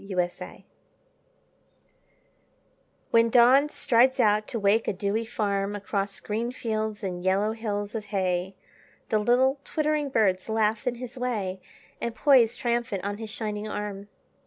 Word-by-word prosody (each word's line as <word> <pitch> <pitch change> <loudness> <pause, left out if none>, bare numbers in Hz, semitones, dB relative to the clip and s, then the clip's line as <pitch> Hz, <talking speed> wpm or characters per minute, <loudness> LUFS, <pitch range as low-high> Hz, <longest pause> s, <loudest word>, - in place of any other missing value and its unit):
Alarm 180 -2 +1
Clocks - - -11 2.5
When 230 0 +4
Dawn 255 +5 +5
strides 260 0 +3
out 215 -2 +3
to 230 - -3
wake 205 +2 +2
a - - +1
dewy 200 +4 -1
farm 205 -3 -1
Across 200 -1 -3
green 225 +3 -2
fields 220 -3 -3
and 180 -2 -4
yellow 195 +3 +2
hills 210 -2 -4
of 220 -2 -4
hay 190 -2 -1 0.5
The 215 - +2
little 255 +5 +2
twittering 305 -2 -1
birds 195 -6 +1
laugh 220 +2 0
in 245 - 0
his 250 +1 -7
way 200 -7 -2 0.4
And 235 -1 -3
poise 255 -6 +4
triumphant 235 -4 -2
on 205 +1 -4
his 220 -1 -6
shining 210 -1 -4
arm. 205 -1 -5
215 Hz, 140 wpm, -26 LUFS, 200-240 Hz, 2.5 s, Dawn